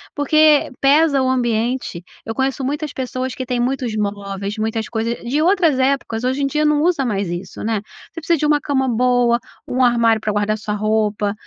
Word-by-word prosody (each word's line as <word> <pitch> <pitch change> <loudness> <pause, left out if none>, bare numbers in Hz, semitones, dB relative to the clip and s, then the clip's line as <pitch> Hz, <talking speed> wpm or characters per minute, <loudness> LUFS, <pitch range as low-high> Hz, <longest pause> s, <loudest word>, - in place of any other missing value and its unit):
porque 300 0 +4
pesa 280 0 +4
o 260 - +1
ambiente. 240 -6 -1 0.2
Eu 225 - -4
conheço 265 +1 -1
muitas 295 +2 -3
pessoas 255 0 -4
que 255 - -5
têm 245 0 -2
muitos 250 -2 -1
móveis, 200 -1 -3
muitas 220 0 -2
coisas 230 +1 -2
de 260 +5 -1
outras 340 -5 +3
épocas, 260 -4 0
hoje 260 +3 0
em - - +2
dia 300 +2 0
não 300 -1 +2
usa 325 -5 +1
mais 200 -5 -1
isso, 175 +2 -6
né. 220 -2 -1 0.3
Você 330 - -8
precisa 335 +1 +1
de 300 - -1
1 295 0 +3
cama 265 -2 0
boa, 245 0 +2 0.3
1 255 +1 0
armário 230 -2 +3
pra 215 -1 -2
guardar 205 +1 0
sua 215 -1 -4
roupa, 210 -1 0
250 Hz, 195 wpm, -19 LUFS, 215-280 Hz, 0.3 s, porque